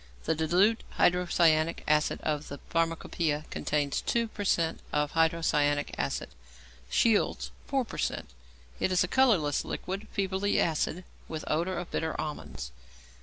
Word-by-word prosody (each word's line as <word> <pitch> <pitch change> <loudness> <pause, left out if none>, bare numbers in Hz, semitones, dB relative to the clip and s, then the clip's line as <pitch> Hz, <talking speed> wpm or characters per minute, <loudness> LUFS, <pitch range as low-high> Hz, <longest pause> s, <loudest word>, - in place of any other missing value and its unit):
The - - +2
diluted 180 +8 +2
hydrocyanic 170 -2 +3
acid 150 0 +2
of 150 -1 -2
the 140 - -6
Pharmacopoeia 165 -2 0
contains 145 -1 -1
2 235 -1 0
per 205 - -5
cent. 170 -4 +1
of 150 0 0
hydrocyanic 160 -3 +2
acid, - - -2 0.6
Scheele's 225 -3 +2 0.2
4 270 -3 +1
per - - -8
cent. - - -1 0.5
It - - +1
is 185 0 +4
a - - -1
colourless 190 - +3
liquid, 195 +4 -5
feebly 195 0 0
acid, 165 +2 0 0.2
with 155 -1 -5
odour 170 +4 0
of 175 0 -5
bitter 160 -1 -2
almonds. 145 - -5
165 Hz, 135 wpm, -29 LUFS, 150-190 Hz, 0.6 s, is